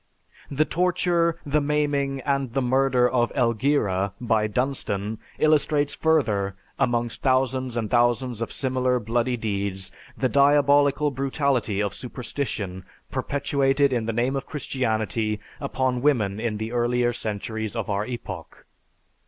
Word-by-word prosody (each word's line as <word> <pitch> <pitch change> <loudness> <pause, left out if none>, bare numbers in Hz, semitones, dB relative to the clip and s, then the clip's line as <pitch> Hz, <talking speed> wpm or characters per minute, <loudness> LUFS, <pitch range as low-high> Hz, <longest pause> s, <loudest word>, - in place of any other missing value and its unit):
"The 145 +2 +1
torture, 170 -1 +1
the 150 +1 +1
maiming, 145 -2 0
and 140 -4 -1
the 135 - +2
murder 130 0 +3
of 120 -1 +1
Elgira 110 -6 +1
by 110 -3 +1
Dunstan 110 -3 -2 0.2
illustrates 150 -1 +2
further, 110 -12 +1 0.2
amongst 120 -1 0
thousands 130 -2 +1
and 115 -2 -1
thousands 120 0 +2
of 115 - -3
similar 130 -1 0
bloody 120 +2 0
deeds, 100 -3 -3 0.3
the 130 - +1
diabolical 145 +1 +4
brutality 135 -6 0
of 100 - -2
superstition 120 -7 -4 0.3
perpetuated 140 -1 +1
in 115 -3 -1
the - - +1
name 120 +4 0
of 135 - -4
Christianity 110 -6 -1 0.2
upon 130 -2 -1
women 110 -8 +2
in 110 -2 -2
the 110 +1 -4
earlier 120 0 +1
centuries 110 0 -4
of 115 -3 -2
our 100 0 0
epoch. 120 +1 -7
125 Hz, 130 wpm, -24 LUFS, 110-140 Hz, 0.3 s, diabolical